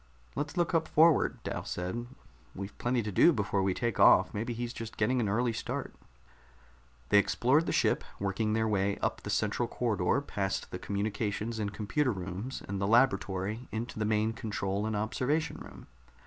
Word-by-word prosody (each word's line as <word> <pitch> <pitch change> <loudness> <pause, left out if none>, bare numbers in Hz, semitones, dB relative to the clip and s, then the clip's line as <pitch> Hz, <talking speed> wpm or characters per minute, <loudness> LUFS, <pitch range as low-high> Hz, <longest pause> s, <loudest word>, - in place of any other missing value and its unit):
"Let's 145 +4 -3
look 175 0 +1
up 160 -1 +2
forward," 160 -1 +4
Dal - - -4
said. 90 +7 -4 0.5
"We've 100 +2 -6
plenty 120 -1 0
to 105 - -3
do 170 - +6
before 100 -7 0
we 95 -1 +1
take 120 -4 -2
off. - - +6
Maybe 115 +4 -3
he's 120 +1 -4
just 115 -1 -7
getting 125 +4 +2
an 110 -4 0
early 120 +3 +1
start." 110 - -4 1.2
They 105 - +7
explored 125 - +2
the - - 0
ship, - - +2 0.2
working 100 +2 -1
their 110 0 +1
way 100 -1 +1
up - - -2
the - - -7
central - - 0
corridor - - 0
past 95 -1 -3
the - - -5
communications 105 +2 -2
and 100 -1 -2
computer 125 +7 0
rooms 95 +5 -5
and 100 0 -3
the 100 - +1
laboratory 105 -1 +1
into 110 0 -4
the 110 - 0
main 110 +1 +1
control 105 -2 -2
and 110 - -2
observation 145 +9 -1
room. - - -11
110 Hz, 175 wpm, -30 LUFS, 100-120 Hz, 1.2 s, They